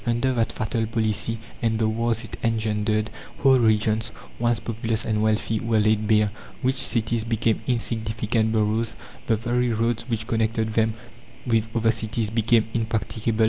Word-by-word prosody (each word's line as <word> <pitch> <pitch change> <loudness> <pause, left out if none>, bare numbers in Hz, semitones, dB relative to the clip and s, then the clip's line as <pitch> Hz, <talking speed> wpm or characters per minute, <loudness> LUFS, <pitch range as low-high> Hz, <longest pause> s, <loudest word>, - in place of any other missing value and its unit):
Under 120 +2 +1
that 115 -2 +1
fatal 110 +1 -1
policy 110 0 0 0.2
and 115 -1 +1
the 110 0 +2
wars 115 +1 0
it 110 - -7
engendered, 110 -1 0 0.3
whole 135 -2 +5
regions, 110 -1 +2 0.3
once 120 -1 +2
populous 115 0 -2
and 105 -1 0
wealthy, 110 0 +1
were 115 -1 +1
laid 110 0 +2
bare; 105 -1 +3 0.3
rich 130 +1 +1
cities 115 -2 0
became 115 -1 0
insignificant 110 -2 0
boroughs; 110 +1 +1 0.3
the 115 - +3
very 120 +2 0
roads 115 +1 -1
which 110 -1 -1
connected 110 -1 0
them 110 0 +2 0.5
with 115 -2 +2
other 115 -1 +3
cities 110 -1 -2
became 115 0 +3
impracticable. 110 0 -1
110 Hz, 150 wpm, -24 LUFS, 110-115 Hz, 0.5 s, whole